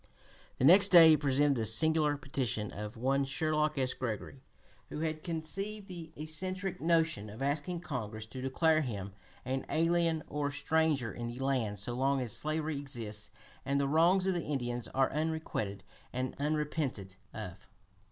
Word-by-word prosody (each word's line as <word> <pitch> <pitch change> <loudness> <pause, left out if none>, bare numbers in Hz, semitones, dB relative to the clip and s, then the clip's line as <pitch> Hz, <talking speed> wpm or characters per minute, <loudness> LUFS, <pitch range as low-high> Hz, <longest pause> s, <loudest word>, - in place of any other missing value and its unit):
The - - +2
next 195 +6 +8
day 170 -4 +9
he 155 - +8
presented 145 0 +2
the 115 - 0
singular 150 +6 +2
petition 130 -6 -2
of 105 +2 -7
one 135 +4 +1
Sherlock 150 +1 0
S. 130 -1 +1
Gregory, 130 +2 -5 0.5
who 150 - -5
had 155 -1 -2
conceived 195 +6 -3
the 170 -4 -8
eccentric 185 +5 -3
notion 160 -10 +1
of 110 +6 -6
asking 150 +5 -1
Congress 110 -9 -5
to 130 +3 -8
declare 155 +4 +2
him 100 -8 -4 0.3
"an 130 +1 -2
alien 165 -1 +2
or 145 0 -2
stranger 145 -3 +1
in 120 -1 -5
the 120 +1 -6
land 130 -6 0
so 100 +5 -3
long 135 +2 +1
as 125 -3 -3
slavery 155 +2 -2
exists 115 -7 -5 0.3
and 140 +1 0
the 140 - +1
wrongs 170 +6 +4
of 190 - +2
the 175 - -1
Indians 120 -5 -2
are 135 0 +1
unrequited 155 -10 -2 0.3
and 130 +1 -2
unrepented 150 - -2 0.2
of." 95 -2 -8
145 Hz, 160 wpm, -32 LUFS, 125-160 Hz, 0.5 s, day